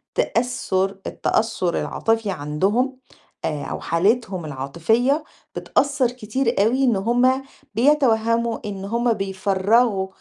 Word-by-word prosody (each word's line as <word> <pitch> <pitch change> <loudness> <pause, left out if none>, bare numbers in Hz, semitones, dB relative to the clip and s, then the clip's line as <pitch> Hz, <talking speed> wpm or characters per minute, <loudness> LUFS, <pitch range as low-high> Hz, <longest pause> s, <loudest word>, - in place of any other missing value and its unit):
تأثُّر 195 -6 0
التأثّر 215 -6 0
العاطفي 225 -3 -1
عندهم 195 - 0 0.5
آآ 150 -2 -2
أو - - -4
حالتهم 190 0 0
العاطفية 170 - 0 0.3
بتأثّر 280 -4 +1
كتير 245 +1 -2
أوي 250 +5 +2
إن 245 -5 +3
هم 245 +6 +2 0.3
بيتوهَّموا 230 -3 +2
إن 195 -2 -5
هم 235 +3 +1
بيفرَّغوا 195 +1 +1
225 Hz, 100 wpm, -22 LUFS, 190-245 Hz, 0.5 s, إن